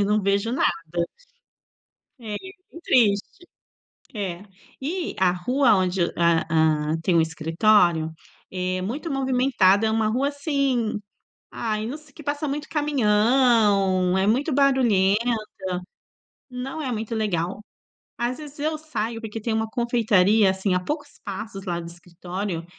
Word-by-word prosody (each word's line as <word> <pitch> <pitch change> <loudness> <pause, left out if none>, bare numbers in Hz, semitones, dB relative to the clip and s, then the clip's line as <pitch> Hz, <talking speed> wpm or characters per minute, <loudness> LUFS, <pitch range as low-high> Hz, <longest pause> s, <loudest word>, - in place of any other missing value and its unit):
e 200 - +3
não 210 0 +1
vejo 200 +3 +1
nada. 170 - -1 1.1
É, 215 -2 -6
e 380 - -10
é - - -13 0.2
bem 335 - -11
triste. 235 - +1 0.7
É. 190 -3 -4 0.4
E 335 +6 -3
a 185 -1 +4
rua 245 +9 +2
onde 185 -1 0
a 170 -1 +2
hã, 155 -1 +2
tem 175 0 +1
o 165 - +5
escritório, 165 +1 +2 0.4
é 185 0 -2
muito 275 - -4
movimentada, 250 -7 +3
é - - +1
uma 220 0 +1
rua, 250 +6 +1
assim, 275 -7 -1 0.5
ai, 215 -2 -2
não 255 +6 -4
se 305 -2 -19
que 305 - -12
passa 290 +1 -2
muito 295 +2 -4
caminhão, 215 - +3
é 190 +1 +2
muito 265 +8 +1
barulhenta, 235 -7 +3 1.3
não 260 +5 -5
é 265 -4 -3
muito 225 0 -3
legal. 195 -2 -2 0.5
Às 240 +1 -1
vezes 295 -2 -11
eu 310 +2 -1
saio, 235 -8 -4
porque 225 0 -6
tem 225 +1 -1
uma 220 0 0
confeitaria, 220 -4 +3
assim, 190 0 0
a - - +2
poucos 290 - -5
passos 200 -1 -6
lá 175 -2 -2
do 170 - -7
escritório, 175 +1 -6
215 Hz, 145 wpm, -24 LUFS, 185-265 Hz, 1.3 s, o